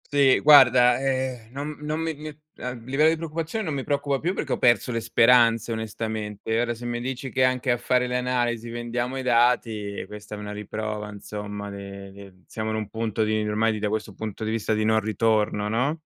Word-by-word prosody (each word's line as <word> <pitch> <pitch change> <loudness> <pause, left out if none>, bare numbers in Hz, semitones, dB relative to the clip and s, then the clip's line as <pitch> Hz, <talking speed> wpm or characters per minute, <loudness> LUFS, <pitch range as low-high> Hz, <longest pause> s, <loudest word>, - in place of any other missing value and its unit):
Sì, 140 -2 +5
guarda, 125 -4 +7
ehm, 130 -4 -2
non 145 +2 -5
non 150 +2 -3
mi 165 0 -1
mi 150 +2 -9 0.3
a 125 - -4
livello 130 +6 +1
di 160 - +4
preoccupazione 165 +6 -4
non 160 -6 -3
mi 135 -2 -3
preoccupa 140 -1 0
più, 175 +6 -1
perché 145 -7 -4
ho - - +1
perso 120 0 +3
le 115 - -1
speranze 115 0 +4
onestamente. 110 -1 -3
Ora, 120 0 0
se 120 +2 -9
mi 120 0 -2
dici 130 +2 -4
che 130 -1 +3
anche 130 0 +1
a 120 - +2
fare 125 +1 +1
le 125 0 -1
analisi 120 -2 -1
vendiamo 120 +2 -3
i - - -2
dati, 115 -4 +1
questa 105 +1 -9
è - - -8
una 105 0 -6
riprova 105 0 -5
insomma 105 0 -7
de 100 0 -9
de 95 -2 -14
siamo 110 0 -4
in - - -2
un 110 -2 -4
punto 110 0 -1
di, 110 0 0
ormai 110 +1 +1
da 105 - -1
questo 105 0 -3
punto 110 +1 -6
di 110 - -1
vista, 110 -1 -1
di 110 0 0
non 110 0 +3
ritorno, 105 -1 0
no, 140 +9 0
115 Hz, 210 wpm, -25 LUFS, 105-130 Hz, 0.3 s, guarda